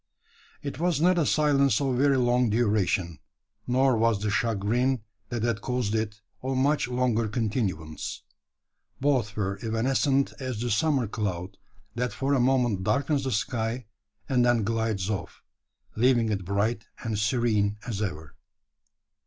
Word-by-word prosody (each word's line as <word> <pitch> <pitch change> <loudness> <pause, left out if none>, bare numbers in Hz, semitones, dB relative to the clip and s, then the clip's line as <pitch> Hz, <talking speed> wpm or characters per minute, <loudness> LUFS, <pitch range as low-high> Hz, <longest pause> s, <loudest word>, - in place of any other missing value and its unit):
It 140 -1 -5
was 170 -3 +1
not 175 +2 +4
a 155 - +2
silence 145 -2 +3
of 135 -3 0
very 140 +1 +3
long 125 -1 +3
duration, 105 -6 +1 0.5
nor 130 +1 +3
was 115 -2 +2
the 105 0 -1
chagrin 115 +4 +1 0.3
that 120 -2 -3
had 115 -3 0
caused 125 -4 -1
it 105 -1 -2 0.2
of 130 0 -2
much 140 0 +2
longer 125 -3 +1
continuance. 105 - -3 0.8
Both 130 -7 +1
were 100 -1 -2
evanescent 135 +5 +1
as 130 -5 -4
the 120 +1 -1
summer 135 +3 +2
cloud 95 -3 -3 0.4
that 120 -1 -2
for 135 +7 0
a 135 - +3
moment 120 -6 +2
darkens 140 +4 +1
the 130 - -1
sky, 120 +1 -2 0.4
and 125 -3 +2
then 120 -2 +3
glides 110 -3 -1
off 105 -4 -5 0.5
leaving 120 -1 +3
it 95 -3 -2
bright 110 +4 -1 0.2
and 110 -3 -2
serene 105 -2 +1
as 110 -4 -3
ever. 80 -7 -5
115 Hz, 145 wpm, -27 LUFS, 105-130 Hz, 0.8 s, not